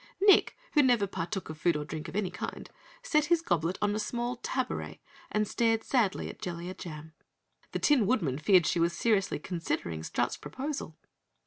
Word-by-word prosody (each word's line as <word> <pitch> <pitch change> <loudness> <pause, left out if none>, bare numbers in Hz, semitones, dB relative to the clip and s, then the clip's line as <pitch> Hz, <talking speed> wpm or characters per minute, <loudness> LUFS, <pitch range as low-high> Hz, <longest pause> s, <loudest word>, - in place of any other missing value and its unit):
Nick, 400 0 +5 0.2
who 295 - +6
never 245 -6 +4
partook 190 +1 -4
of 155 -1 -8
food 170 0 +2
or 150 - -4
drink 155 0 -6
of - - -8
any 195 -3 0
kind, 180 - -6 0.3
set 305 -11 +2
his 335 +1 +2
goblet 175 - 0
on 205 0 +2
a 215 - -1
small 240 +3 -2
tabouret 255 +1 -3 0.3
and 215 0 +1
stared 225 0 +1
sadly 225 -7 +1
at - - -9
Jellia 175 +1 -4
Jam. 160 -3 -9 0.6
The - - -1
Tin 260 -9 +3
Woodman 165 - +1
feared 180 +1 +5
she 170 - +1
was 170 +1 +2
seriously 200 -1 +1
considering 150 - -3
Strut's - - -1
proposal. 270 - -5
195 Hz, 180 wpm, -30 LUFS, 165-245 Hz, 0.6 s, who